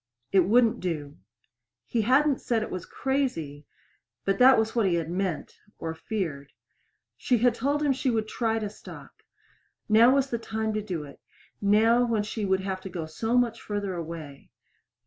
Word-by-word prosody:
It 190 Hz, -3 st, +4 dB
wouldn't 230 Hz, +3 st, +3 dB
do. 150 Hz, -5 st, -4 dB, 0.7 s
He 235 Hz, -, 0 dB
hadn't 270 Hz, +5 st, +3 dB
said 225 Hz, -2 st, 0 dB
it -, -, -7 dB
was 185 Hz, -2 st, -5 dB
crazy, 165 Hz, -, -2 dB, 0.6 s
but 195 Hz, +4 st, 0 dB
that 260 Hz, +1 st, +7 dB
was 220 Hz, +1 st, 0 dB
what 225 Hz, -4 st, +3 dB
he 170 Hz, -2 st, +2 dB
meant 180 Hz, +1 st, -3 dB, 0.2 s
or 160 Hz, 0 st, -4 dB
feared. 160 Hz, -7 st, -4 dB, 0.7 s
She 250 Hz, -, +1 dB
had 240 Hz, +1 st, +3 dB
told 285 Hz, +5 st, -1 dB
him 285 Hz, -2 st, +3 dB
she 265 Hz, 0 st, -1 dB
would 220 Hz, -2 st, 0 dB
try 225 Hz, 0 st, -1 dB
to 215 Hz, -2 st, -2 dB
stop. 205 Hz, -, -12 dB, 0.7 s
Now 230 Hz, +5 st, +6 dB
was 275 Hz, -1 st, +1 dB
the 235 Hz, -, -1 dB
time 220 Hz, -1 st, -3 dB
to 215 Hz, -, -1 dB
do 180 Hz, -7 st, -4 dB
it 140 Hz, -1 st, -12 dB, 0.4 s
now 220 Hz, +4 st, +4 dB
when 230 Hz, -3 st, 0 dB
she 210 Hz, 0 st, -4 dB
would 190 Hz, 0 st, +1 dB
have 190 Hz, -1 st, -4 dB
to 190 Hz, -, -7 dB
go 170 Hz, -3 st, -5 dB
so 225 Hz, +9 st, -1 dB
much 235 Hz, -2 st, +1 dB
farther 205 Hz, -2 st, -3 dB
away. 160 Hz, -5 st, -7 dB
215 Hz, 175 wpm, -27 LUFS, 180-240 Hz, 0.7 s, that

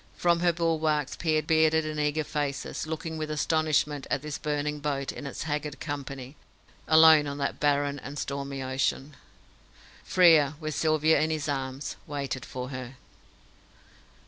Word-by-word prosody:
From 170 Hz, -1 st, +2 dB
her 175 Hz, 0 st, +3 dB
bulwarks 160 Hz, -4 st, 0 dB
peered 155 Hz, -2 st, 0 dB
bearded 160 Hz, 0 st, +3 dB
and 155 Hz, 0 st, -4 dB
eager 150 Hz, +1 st, 0 dB
faces, 145 Hz, +1 st, -3 dB
looking 160 Hz, 0 st, -4 dB
with 155 Hz, 0 st, -3 dB
astonishment 150 Hz, -2 st, 0 dB
at 145 Hz, 0 st, -1 dB
this 150 Hz, -2 st, -5 dB
burning 150 Hz, 0 st, -2 dB
boat 140 Hz, -2 st, -2 dB
and 145 Hz, -, -7 dB
its -, -, -5 dB
haggard 150 Hz, -1 st, -3 dB
company, 140 Hz, -2 st, -6 dB, 0.5 s
alone 160 Hz, -2 st, +7 dB
on 140 Hz, 0 st, -4 dB
that 140 Hz, -, -2 dB
barren 145 Hz, -1 st, +1 dB
and 140 Hz, +2 st, -8 dB
stormy 140 Hz, -1 st, -4 dB
ocean. 135 Hz, +2 st, -1 dB, 0.9 s
Frere, 160 Hz, -5 st, +5 dB
with 155 Hz, -1 st, -4 dB
Sylvia 155 Hz, +1 st, +3 dB
in 155 Hz, -, +1 dB
his 155 Hz, -2 st, -2 dB
arms, 135 Hz, -1 st, -3 dB
waited 140 Hz, -3 st, -4 dB
for 125 Hz, 0 st, -6 dB
her. 130 Hz, -1 st, -7 dB
150 Hz, 145 wpm, -27 LUFS, 140-155 Hz, 0.9 s, alone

